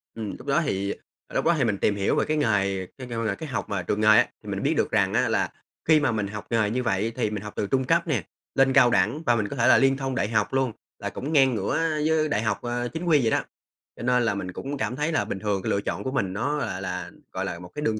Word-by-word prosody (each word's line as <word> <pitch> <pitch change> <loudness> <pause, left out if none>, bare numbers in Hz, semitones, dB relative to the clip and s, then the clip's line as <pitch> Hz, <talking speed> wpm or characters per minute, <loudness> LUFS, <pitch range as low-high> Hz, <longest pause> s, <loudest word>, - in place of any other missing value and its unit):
Ừm, 110 -3 -5
lúc 125 - -13
đó 140 +4 +3
thì 100 -2 -1 0.3
ờ, - - -16
lúc - - +1
đó 170 - +5
thì 135 - +2
mình 105 -4 +1
tìm 100 - +1
hiểu 100 -1 +1
về - - +2
cái 155 0 0
nghề 100 -7 +1
kêu 130 -2 -8
kêu 115 -1 -2
là 105 -3 0
cái 160 - -7
học - - -3
mà 100 -3 -2
trường 105 +5 -1
nghề 105 - +3
á, 110 - +7 0.2
thì - - -8
mình - - -3
biết - - +2
được - - +1
rằng - - +2
á - - +2
là - - +1 0.4
khi 155 -1 +6
mà 145 -4 +1
mình 105 -3 -1
học 105 0 -7
nghề 110 -3 +2
như 125 +4 -1
vậy 110 0 0
thì 120 -4 0
mình 105 -1 -4
học 105 - -7
từ 100 - -1
trung 130 +3 +1
cấp 170 +4 +2
nè, 120 - 0 0.3
lên 135 0 +4
cao 130 -4 +6
đẳng 120 - +2
và 120 -1 +4
mình 105 -3 0
có 140 - -6
thể 120 - +2
là - - +7
liên 135 0 +3
thông 135 -1 -3
đại 105 - 0
học 110 +1 0
luôn, 135 -3 +1 0.3
là - - -3
cũng 145 +5 -5
ngang 135 -5 +5
ngửa 100 -2 -1 0.3
với 155 -1 +2
đại 110 - +1
học, 105 -3 -1
à, 120 0 -2
chính 165 +2 -4
quy 155 -5 +4
vậy 110 -2 +1
đó, - - +3 0.6
cho - - -8
nên 125 0 +3
là 115 - +1
mình 95 -2 -4
cũng 140 +8 -5
cảm 125 - -2
thấy 150 +3 -1
là 160 - +1
bình 95 - -4
thường 100 -1 -1
lựa 100 - +1
chọn - - -3
của 130 - -2
mình 100 -9 -1
nó 145 +9 -1
là 95 -9 -3
là, 90 -2 -4 0.2
gọi 95 +1 -3
là, 85 -3 -4
một 90 - -10
cái 150 - -4
đường 110 -6 0
115 Hz, 305 wpm, -25 LUFS, 100-135 Hz, 0.6 s, á